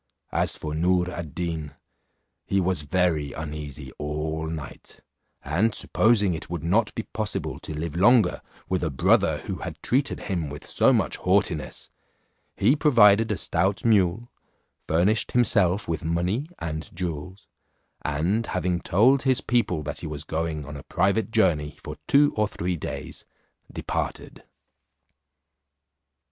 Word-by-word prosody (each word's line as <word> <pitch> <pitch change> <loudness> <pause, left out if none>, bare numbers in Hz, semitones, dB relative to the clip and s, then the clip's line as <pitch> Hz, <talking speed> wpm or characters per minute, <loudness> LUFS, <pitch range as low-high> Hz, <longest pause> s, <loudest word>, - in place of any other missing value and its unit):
As - - 0
for 75 -1 -5
Noor 90 +3 +1
ad 85 -3 -7
Deen, 80 -4 -4 0.7
he 100 - +2
was 90 -3 +1
very 80 -2 0
uneasy 75 -3 -6
all 75 +2 -3
night, 80 -4 -8 0.4
and 95 +10 +1
supposing 105 -5 +3
it 80 - -6
would 85 -1 -4
not 105 +6 +2
be 115 - -3
possible 110 -2 -4
to 75 - -7
live 80 0 -4
longer 105 +1 +4 0.3
with 95 -1 -1
a 80 - 0
brother 65 - +3
who - - -5
had - - -7
treated 135 +3 0
him 85 -7 -2
with 75 +1 -9
so - - +3
much - - +1
haughtiness, 90 -6 0 0.6
he 120 +8 +3
provided 115 -8 +5
a 105 - 0
stout 95 +6 0
mule, 110 +1 +2 0.6
furnished 90 +7 +2
himself 100 -6 +3
with 80 -2 -2
money 90 - -1
and 80 -1 -5
jewels, 90 +2 -5 0.6
and 85 +10 0
having 90 -2 -1
told 125 +9 +4
his 130 -2 +2
people 105 -10 0
that 75 0 -5
he 85 - -5
was 75 -1 -5
going 80 -1 -3
on 75 +1 -8
a 70 - -7
private 100 +8 0
journey 80 -10 +1
for 75 0 -7
two 145 +1 +5
or 105 -1 +2
three 90 -2 -3
days, 80 - -6 0.5
departed. - - -4
90 Hz, 140 wpm, -25 LUFS, 80-105 Hz, 0.7 s, provided